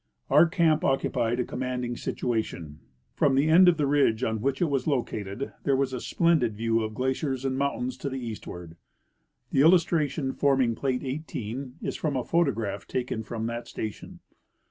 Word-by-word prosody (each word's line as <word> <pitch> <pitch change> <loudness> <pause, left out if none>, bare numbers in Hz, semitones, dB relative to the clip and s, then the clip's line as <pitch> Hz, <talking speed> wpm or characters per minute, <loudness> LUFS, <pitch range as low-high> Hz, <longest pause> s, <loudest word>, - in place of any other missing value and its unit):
Our 170 - +7
camp 160 -2 +2
occupied 120 -3 +1
a - - +2
commanding 125 -1 -3
situation. 110 - -3 0.3
From 140 -2 +2
the 145 +3 +3
end 180 +3 +7
of 170 - +2
the 150 - +1
ridge 135 -5 +2
on 110 -2 -1
which 135 +2 0
it - - +3
was 140 -3 -1
located 120 -4 -2
there 140 - +2
was 130 -1 0
a 125 - -3
splendid 160 -10 +2
view 115 0 +1
of 110 0 -4
glaciers 130 +1 -1
and 130 -1 0
mountains 130 -2 -1
to 140 - -4
the 135 - -4
eastward. 90 -8 -7 0.7
The 135 - +3
illustration 155 -4 +3
forming 135 -4 +2
plate 130 +2 -2
18 130 -2 -5
is - - -2
from 150 -3 -2
a 130 - 0
photograph 120 -12 0
taken 125 -3 -2
from 110 0 -5
that 115 +1 -4
station. 110 -2 -7
130 Hz, 170 wpm, -27 LUFS, 115-140 Hz, 0.7 s, Our